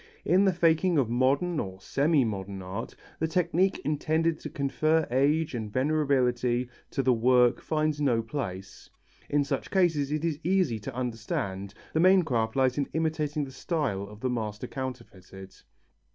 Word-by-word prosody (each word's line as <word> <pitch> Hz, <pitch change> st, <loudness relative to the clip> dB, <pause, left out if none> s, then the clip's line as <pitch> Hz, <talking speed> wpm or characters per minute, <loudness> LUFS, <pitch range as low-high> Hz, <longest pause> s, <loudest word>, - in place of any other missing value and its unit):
In 190 Hz, +3 st, +4 dB
the 190 Hz, -, +4 dB
faking 170 Hz, 0 st, +2 dB
of 125 Hz, -5 st, +1 dB
modern, 140 Hz, +7 st, +1 dB
or 95 Hz, -1 st, -5 dB
semi 140 Hz, -, +2 dB
modern 100 Hz, -2 st, -4 dB
art, 95 Hz, +5 st, -6 dB, 0.2 s
the 160 Hz, -, +1 dB
technique 180 Hz, +3 st, +1 dB
intended 155 Hz, +2 st, 0 dB
to -, -, -7 dB
confer 155 Hz, +3 st, +1 dB
age 145 Hz, +5 st, +2 dB
and 110 Hz, -3 st, -4 dB
venerability 125 Hz, -3 st, +1 dB, 0.2 s
to 135 Hz, -, -1 dB
the 130 Hz, -1 st, +4 dB
work 125 Hz, +1 st, +3 dB
finds 155 Hz, -1 st, -1 dB
no 120 Hz, -5 st, +2 dB
place. 100 Hz, -7 st, -6 dB, 0.4 s
In 145 Hz, 0 st, +2 dB
such 140 Hz, -, -3 dB
cases, 160 Hz, -7 st, +2 dB
it 155 Hz, +2 st, -1 dB
is 155 Hz, -3 st, -1 dB
easy 180 Hz, -, +1 dB
to 115 Hz, +4 st, -7 dB
understand, 105 Hz, -5 st, -3 dB, 0.2 s
the 160 Hz, -, +1 dB
main 185 Hz, +2 st, +6 dB
craft 115 Hz, -7 st, -1 dB
lies 130 Hz, 0 st, +2 dB
in 140 Hz, -, -1 dB
imitating 155 Hz, -2 st, -1 dB
the 135 Hz, -, -10 dB
style 140 Hz, -, -2 dB
of 105 Hz, +1 st, -13 dB
the 130 Hz, -, 0 dB
master 110 Hz, -1 st, -3 dB
counterfeited. 115 Hz, -8 st, -8 dB
135 Hz, 160 wpm, -28 LUFS, 115-155 Hz, 0.4 s, main